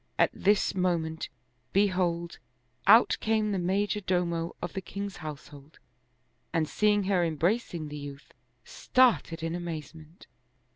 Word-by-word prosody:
At - - +4
this 205 +1 +2
mo 180 -2 +2
ment, 160 0 -5 0.4
behold, 180 -4 +1 0.5
out 225 +4 +7
came 215 -1 +1
the 195 - 0
major 200 +4 0
domo 175 -3 -1
of 175 - -5
the 190 - -3
king's 200 +2 -6
house 155 -3 -8
hold 145 +1 -15 0.7
and 160 -2 +1
seeing 210 +2 +2
her 190 -2 +2
embracing 170 +1 -1
the 150 0 -6
youth, 140 0 -10 0.3
started 235 -10 +2
in 165 0 -2
amaze 170 -3 -5
ment. 160 +1 -15
175 Hz, 140 wpm, -28 LUFS, 160-200 Hz, 0.7 s, out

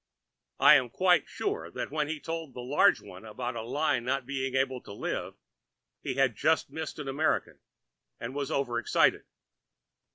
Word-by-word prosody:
I - - +9
am 125 - -1
quite 180 +3 +3
sure - - -3
that - - -5
when 150 -1 0
he 155 0 -3
told 165 -3 -5
that - - -7
large 130 +4 +3
one 90 +3 -12
about 120 +3 -5
a 115 - -3
lie 140 +3 0
not 130 +2 -2
being 135 -1 -3
able 130 -1 0
to - - -12
live 100 - -4 0.7
he - - -3
had 135 -4 +2
just 155 +5 +1
missed 160 +1 -5
an 150 -2 -6
American 145 +3 0 0.6
and 115 +2 -5
was 140 -1 -3
over 120 -4 0
excited. - - +2
135 Hz, 170 wpm, -29 LUFS, 120-150 Hz, 0.7 s, I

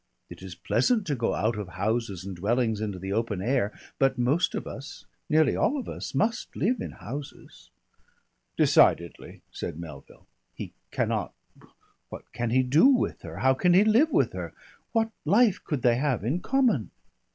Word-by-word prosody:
It - - -10
is - - -8
pleasant 235 -5 +1
to 145 - -1
go 115 -2 -1
out 110 +1 0
of 105 - -5
houses 100 0 -2
and 95 -1 -6
dwellings 110 +3 0
into 105 -3 -3
the 95 +2 -4
open 110 -3 -1
air, 115 0 0 0.3
but 135 0 +2
most 140 +9 +1
of - - -4
us, 135 +2 -9 0.2
nearly 155 0 +3
all 280 +7 +1
of 260 - -5
us - - -6
must 225 +2 -1
live 250 +5 0
in - - -4
houses." 135 +5 -9 0.9
"Decidedly," 85 0 +2
said 80 - -6
Melville. 75 -5 -11 0.3
"He - - -7 0.2
cannot - - -2 0.7
What - - -10
can 120 -1 -2
he 130 +3 +3
do 140 - +5
with 270 -3 +1
her? - - -9
How 130 - +6
can 175 +6 +3
he 195 - +7
live 230 +9 +4
with - - +2
her? - - -6 0.4
What 225 -1 +1
life 205 +5 +3
could 145 -6 -3
they 120 -1 +4
have 130 -5 0
in 135 +11 0
common?" 235 - +1
130 Hz, 175 wpm, -27 LUFS, -, 0.9 s, he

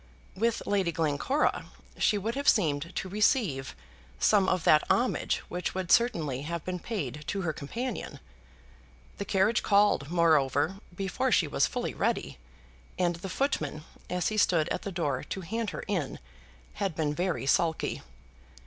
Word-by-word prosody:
With 230 +4 0
Lady 195 -4 +1
Glencora 165 - 0 0.3
she 210 - +3
would 220 +4 -2
have 280 +2 +2
seemed 165 -4 +1
to - - -2
receive 195 - +1 0.4
some 190 - +4
of 185 -3 0
that 150 - +5
homage 250 +2 +1
which 180 +1 -3
would 185 -2 -2
certainly 160 - +2
have 165 +2 -4
been 185 0 -3
paid 150 - -4
to 200 - -2
her 160 -2 -1
companion. 230 - -5 1.0
The 200 - -3
carriage 200 +4 +2
called, 200 -8 +3
moreover, 160 0 +2 0.2
before 190 -2 -1
she - - +4
was - - +2
fully - - -3
ready, - - -1 0.6
and 175 -2 +1
the 190 +3 -7
footman, 160 - -1 0.3
as 180 -2 0
he 215 - -3
stood 170 -6 +3
at - - -2
the 200 - -5
door 145 -7 -1
to 190 - -5
hand 220 +5 -3
her - - -6
in, 175 -9 -2 0.6
had 195 -5 0
been 150 -2 0
very 175 -4 -1
sulky. 160 +3 +1
180 Hz, 155 wpm, -29 LUFS, 155-205 Hz, 1.0 s, that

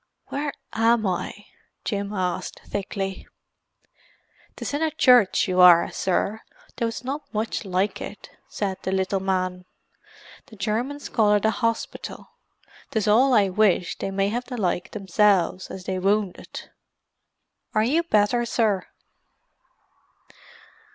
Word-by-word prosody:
"Where 290 +1 -2 0.2
am 225 0 +3
I?" 190 +2 -3 0.4
Jim 200 -2 -2
asked 185 -4 -3
thickly. 195 -1 -4 1.3
"'Tis - - -5
in 290 - -1
a 320 - +2
church 250 -8 +4
you 185 -1 +2
are, 175 -2 +7
sir, 200 +3 -1 0.4
though 235 - 0
it's 230 - -5
not 285 +3 -5
much 220 +1 -2
like 190 +2 -1
it," - - -8 0.2
said 195 -2 -3
the 190 - -3
little 190 +1 0
man. 185 -1 -2 0.8
"The 220 - -14
Germans 235 +8 -2
call 210 -3 +3
it 205 - +1
a 220 - +4
hospital. 230 +1 -3 0.6
'Tis 220 -1 -1
all 250 +5 +5
I 200 -3 +4
wish 185 -2 +2
they - - -2
may 195 +1 0
have 240 +3 -3
the 250 -1 -6
like 180 -2 -1
themselves, 195 -2 +1
and 190 - -7
they 185 0 -2
wounded. 200 0 -2 1.0
Are 215 - +4
you 290 +9 +2
better, 240 -6 +2
sir?" 220 -5 0
205 Hz, 130 wpm, -24 LUFS, 190-230 Hz, 1.3 s, are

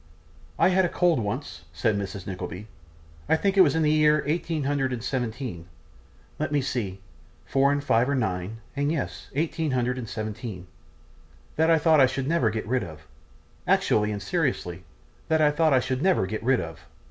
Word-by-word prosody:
I - - +4
had 190 0 +3
a 175 - +1
cold 175 -6 +2
once,' 105 - -4
said 95 +5 +1
Mrs. 100 -1 -5
Nickleby, 90 +1 -6 0.6
'I - - +5
think 195 +4 0
it 195 - +7
was 185 - +4
in 160 - +2
the 150 - +3
year 150 -1 +4
eighteen 160 0 -1
hundred 135 -1 0
and 120 -2 -4
seventeen; 120 -8 -4 0.7
let - - -1
me 145 - +2
see, 115 -8 -3 0.5
four 140 +1 +3
and 145 0 -1
five 120 -1 +2
are 140 - +1
nine, 105 -2 -2
and 145 +1 0
yes, 160 -4 -4
eighteen 160 +1 -1
hundred 125 -1 0
and 115 -4 -6
seventeen, 110 -3 -5 0.9
that 160 +1 +3
I 165 - +6
thought 160 0 +4
I 130 - +6
never 145 -3 +1
should 105 - 0
get 110 - -3
rid 125 -1 0
of; 80 -3 -10 0.6
actually 105 0 +2
and 100 -1 -4
seriously, 105 - -2 0.4
that 160 0 +2
I 150 -1 +4
thought 155 +1 +2
I 130 0 +2
never 180 - +2
should 95 - -3
get 110 - -3
rid 130 +1 +3
of. 80 -2 -9
130 Hz, 190 wpm, -26 LUFS, 105-150 Hz, 0.9 s, it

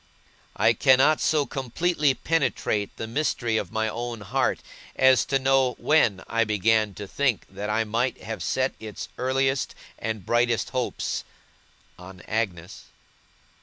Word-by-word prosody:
I 115 - +4
cannot 135 +5 +4
so 150 -2 +2
completely 145 +2 0
penetrate 130 -11 0
the - - -4
mystery 115 -2 -1
of 95 -4 -3
my 110 0 0
own 120 0 -4
heart, 100 - 0 0.3
as 130 -1 +5
to 135 - +1
know 135 -1 +2
when 115 -11 +2
I 115 0 +2
began 110 -1 +1
to 100 +1 -7
think 130 0 0
that 105 +1 -5
I 110 +1 +1
might 115 +3 -2
have 110 +2 -5
set 130 0 0
its 110 -2 -7
earliest 135 +1 0 0.2
and 110 -4 -4
brightest 120 -1 +1
hopes 130 -2 -2 0.8
on 90 0 -11
Agnes. 95 -6 -4
115 Hz, 135 wpm, -25 LUFS, 110-135 Hz, 0.8 s, as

